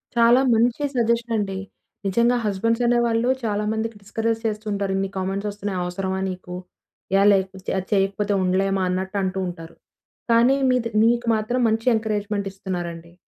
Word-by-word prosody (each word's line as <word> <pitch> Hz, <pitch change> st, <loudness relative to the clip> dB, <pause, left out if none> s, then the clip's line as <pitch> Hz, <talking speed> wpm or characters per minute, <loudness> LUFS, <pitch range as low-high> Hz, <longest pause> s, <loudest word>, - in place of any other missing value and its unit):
చాలా 235 Hz, +2 st, +5 dB
మంచి 235 Hz, +5 st, +2 dB
సజెషన్ 235 Hz, -1 st, +1 dB
అండి. 195 Hz, -2 st, -2 dB, 0.5 s
నిజంగా 235 Hz, +5 st, +3 dB
హస్బెండ్స్ 230 Hz, +4 st, 0 dB
అనేవాళ్ళు 235 Hz, 0 st, +2 dB
చాలా 210 Hz, -2 st, -1 dB
మందికి 225 Hz, 0 st, -3 dB
డిస్కరేజ్ 225 Hz, +3 st, -2 dB
చేస్తూ 215 Hz, 0 st, -2 dB
ఉంటారు. 200 Hz, -1 st, -1 dB
"ఇన్ని 195 Hz, 0 st, -1 dB
కామెంట్స్ 195 Hz, +2 st, -2 dB
వస్తున్నాయి 205 Hz, -2 st, -4 dB
అవసరమా 190 Hz, +1 st, -3 dB
నీకు? 180 Hz, -1 st, -7 dB, 0.6 s
ఏ -, -, +4 dB
లేకపోతే 190 Hz, -1 st, -1 dB
అది 190 Hz, 0 st, -3 dB
చేయకపోతే 200 Hz, +1 st, +1 dB
ఉండలేమా?" 190 Hz, +1 st, +1 dB
అన్నట్టు 190 Hz, +2 st, -2 dB
అంటూ 190 Hz, 0 st, -2 dB
ఉంటారు. 165 Hz, -1 st, -8 dB, 0.6 s
కానీ, 235 Hz, +3 st, +5 dB
మీది 250 Hz, -2 st, +1 dB, 0.2 s
నీకు 240 Hz, +1 st, +2 dB
మాత్రం 220 Hz, +4 st, -1 dB
మంచి 225 Hz, 0 st, 0 dB
ఎంకరేజ్మెంట్ 210 Hz, -2 st, -2 dB
ఇస్తున్నారండి. 175 Hz, -3 st, -6 dB
205 Hz, 145 wpm, -23 LUFS, 190-230 Hz, 0.6 s, చాలా